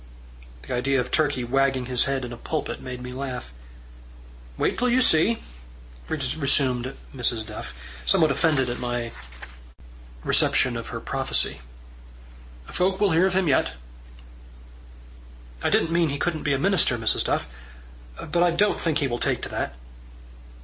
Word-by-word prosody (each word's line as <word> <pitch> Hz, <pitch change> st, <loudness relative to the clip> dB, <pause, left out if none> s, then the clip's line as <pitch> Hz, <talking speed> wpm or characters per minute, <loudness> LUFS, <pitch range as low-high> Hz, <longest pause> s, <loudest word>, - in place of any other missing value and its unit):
The -, -, -5 dB
idea 135 Hz, +2 st, +1 dB
of 125 Hz, -, -3 dB
Turkey 145 Hz, -5 st, +1 dB
wagging 135 Hz, +1 st, +1 dB
his 125 Hz, -1 st, +1 dB
head 135 Hz, -2 st, -1 dB
in 120 Hz, -, -7 dB
a -, -, -5 dB
pulpit 155 Hz, +5 st, -4 dB
made 125 Hz, -1 st, -7 dB
me 125 Hz, 0 st, -6 dB
laugh. 130 Hz, -, -5 dB, 1.0 s
"Wait -, -, +1 dB
till 250 Hz, +1 st, +1 dB
you 245 Hz, +2 st, +4 dB
see," 225 Hz, -1 st, +4 dB, 0.7 s
resumed 135 Hz, -4 st, 0 dB, 0.2 s
Mrs. 120 Hz, -3 st, 0 dB
Duff, 110 Hz, -1 st, -7 dB, 0.3 s
somewhat 155 Hz, -, +4 dB
offended 145 Hz, -6 st, +2 dB
at 120 Hz, -, -3 dB
my 120 Hz, -1 st, -2 dB, 1.1 s
reception -, -, +2 dB
of -, -, -5 dB
her -, -, -5 dB
prophecy. -, -, -1 dB, 1.0 s
"Folk 190 Hz, -, 0 dB
will 205 Hz, -2 st, +3 dB
hear 170 Hz, +4 st, +4 dB
of 190 Hz, -, -2 dB
him 190 Hz, -2 st, +2 dB
yet." 140 Hz, -, +2 dB, 1.9 s
"I -, -, +1 dB
didn't 165 Hz, -, +2 dB
mean 170 Hz, -1 st, +3 dB
he 140 Hz, -, -2 dB
couldn't 160 Hz, 0 st, -1 dB
be 145 Hz, -, +1 dB
a -, -, +2 dB
minister, 175 Hz, -6 st, +3 dB
Mrs. 115 Hz, -1 st, +1 dB
Duff. -, -, 0 dB, 0.7 s
But 170 Hz, +3 st, -1 dB
I 175 Hz, -, +5 dB
don't 200 Hz, +5 st, +2 dB
think 160 Hz, -3 st, 0 dB
he 140 Hz, -, +1 dB
will 120 Hz, -1 st, -3 dB
take -, -, 0 dB
to -, -, -4 dB
that." -, -, -3 dB
135 Hz, 155 wpm, -25 LUFS, 125-165 Hz, 1.9 s, I